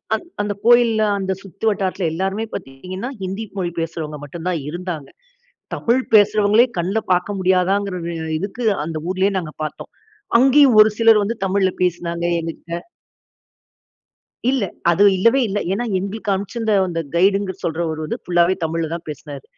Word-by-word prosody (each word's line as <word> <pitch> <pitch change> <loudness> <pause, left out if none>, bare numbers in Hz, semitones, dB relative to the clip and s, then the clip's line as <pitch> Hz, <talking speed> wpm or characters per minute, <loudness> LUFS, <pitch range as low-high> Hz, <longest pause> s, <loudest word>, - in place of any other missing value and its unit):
அந் - - -6 0.2
அந்த 205 0 -1
கோயில்ல, 235 -2 +5 0.2
அந்த 190 0 -2
சுத்து 195 +3 -8
வட்டாரத்தில 190 -3 -1
எல்லாருமே 195 +5 -2
பார்த்தீங்கன்னா, 185 - -6
ஹிந்தி 190 +4 -4
மொழி 175 -2 -1
பேசுறவுங்க 155 -2 -4
மட்டும் 160 +4 -7
தான் 170 - -1
இருந்தாங்க. 175 -3 -5 0.7
தமிழ் 245 +3 +1
பேசுறவங்களே 210 +2 +5
கண்ல 185 +5 0
பார்க்க 180 +3 0
முடியாதாங்கிற 185 +1 +1 0.2
இ - - -5 0.2
இதுக்கு 200 +7 -5 0.2
அந்த 160 0 -5
ஊரிலயே 190 +2 +1
நாங்க 165 -4 -5
பார்த்தோம். 155 - -7 0.5
அங்கயும் 270 -1 +6
ஒரு 215 - +7
சிலர் 225 -2 +6
வந்து 210 +3 -1
தமிழ்ல 190 0 +2
பேசினாங்க, 170 -1 -1 0.2
எங்ககிட்ட. 165 +1 -6 1.7
இல்ல. 260 -5 +1 0.3
அது 175 +4 +3
இல்லவே 230 +8 +4
இல்ல. 205 +1 -1
ஏன்னா, 210 +5 -1
எங்களுக்கு 200 +2 -3
அனுப்பிச்சிருந்த 215 +3 -2
அந்த 165 -1 -2
கைடுனு 195 +2 +2
சொல்றவர் 160 -1 -2
வந்து 155 - -4
ஃபுல்லாவே 175 +1 +3
தமிழ்ல 160 0 -2
தான் 170 -1 -7
பேசினாரு. 145 -2 -8
190 Hz, 145 wpm, -20 LUFS, 170-210 Hz, 1.7 s, ஒரு